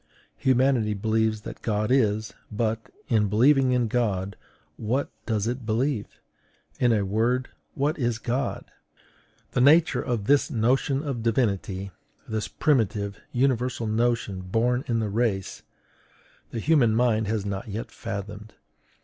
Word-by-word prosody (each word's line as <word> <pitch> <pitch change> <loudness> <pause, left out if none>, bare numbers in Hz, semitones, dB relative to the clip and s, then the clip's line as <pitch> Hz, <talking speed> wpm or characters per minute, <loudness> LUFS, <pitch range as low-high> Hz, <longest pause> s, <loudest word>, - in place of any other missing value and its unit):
Humanity 130 -4 +2
believes 110 +1 0
that - - -9
God 105 0 -1
is; 110 -4 +2 0.2
but, 110 +1 -2 0.2
in 110 -6 +2
believing 130 +5 +4
in 125 -2 +2
God, 100 -5 -1 0.4
what 125 +6 -1 0.2
does 110 -3 0
it 120 +2 -3
believe? 115 +1 0 0.7
In 120 -1 +4
a 105 -3 +2
word, 115 +6 0 0.3
what 150 +3 0
is 120 -3 0
God? 120 +3 -2 0.9
The - - +1
nature 155 +5 +5
of 120 -5 -2
this 140 +4 +3
notion 130 +4 +1
of 135 -6 -3
Divinity, 100 -4 -1 0.4
this 110 -2 -2
primitive, 105 -7 0
universal 125 -2 0
notion, 110 -3 0
born 120 +7 0
in 115 - +1
the 110 -2 -1
race, 105 -4 -1 0.9
the 115 - -4
human 125 -5 +3
mind 110 -3 +2
has 105 -1 -1
not 100 0 -4
yet 110 +2 -5
fathomed. 105 -1 -7
115 Hz, 130 wpm, -26 LUFS, 105-125 Hz, 0.9 s, nature